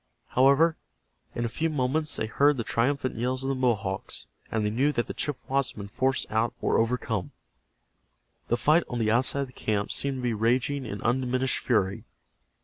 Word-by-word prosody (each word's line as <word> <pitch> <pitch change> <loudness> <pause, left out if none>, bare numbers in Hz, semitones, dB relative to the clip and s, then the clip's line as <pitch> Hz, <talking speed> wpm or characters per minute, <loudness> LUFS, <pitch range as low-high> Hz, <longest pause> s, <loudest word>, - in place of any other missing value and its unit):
However, 140 +6 +4 0.6
in 120 - -1
a - - +1
few 160 +8 -1
moments 150 +2 0
they - - -1
heard 140 +6 +3
the 115 - -1
triumphant 130 +3 0
yells 130 +3 -1
of 135 - -1
the - - +1
Mohawks, 105 - -1 0.3
and 110 -2 0
they 105 - 0
knew 135 +7 +2
that 120 -5 -1
the - - -6
Chippewas 140 -2 -1
had - - -12
been 100 -1 -7
forced 130 +5 0
out 110 +2 +1
or - - +2
overcome. 115 -4 -1 1.1
The 120 - +1
fight 150 +8 +4
on 120 - -3
the 110 -2 +1
outside 130 +4 +2
of 135 - -2
the - - -17
camp 105 -4 -1
seemed 140 -1 0
to 125 - -5
be 120 -2 +1
raging 125 +5 0
in 100 -1 -6
undiminished 130 +2 +1
fury. 100 -6 0
125 Hz, 190 wpm, -27 LUFS, 115-135 Hz, 1.1 s, However